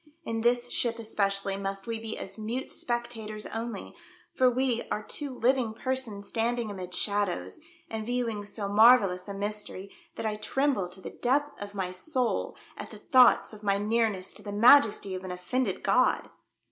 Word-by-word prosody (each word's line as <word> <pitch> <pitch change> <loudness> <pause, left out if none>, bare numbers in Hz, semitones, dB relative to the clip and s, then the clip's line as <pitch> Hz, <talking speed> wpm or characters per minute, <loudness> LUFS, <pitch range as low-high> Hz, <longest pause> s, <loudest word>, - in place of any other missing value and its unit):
In 225 0 -2
this 240 +1 +2
ship 235 -1 0
especially 200 -3 -1
must 195 0 -4
we 230 -1 -3
be 225 0 -4
as 195 - -7
mute 230 +4 -4
spectators 230 -3 -3
only, 225 -2 -5 0.4
for 255 -1 +4
we 250 -1 +1
are 210 - -2
two 290 +5 -3
living 250 -2 +1
persons 235 -5 -3
standing 235 -1 -1
amid 180 -2 -6
shadows, 205 - -1 0.3
and 220 -1 -4
viewing 230 -3 -2
so 205 0 -4
marvellous 205 -3 +5
a 200 - -5
mystery 200 -1 -5 0.2
that - - -5
I 215 -1 -1
tremble 215 -3 0
to 190 +1 -10
the - - -7
depth 285 +2 0
of 205 0 -7
my 185 -2 -2
soul 250 +6 -1 0.2
at - - -7
the - - -10
thoughts 255 -3 +5
of 210 - -11
my 200 -2 +1
nearness 210 -2 0
to - - -11
the 205 - -6
Majesty 215 -2 +5
of 185 0 -5
an 185 - -6
offended 180 +9 -2
God - - +2
220 Hz, 170 wpm, -28 LUFS, 200-240 Hz, 0.4 s, marvellous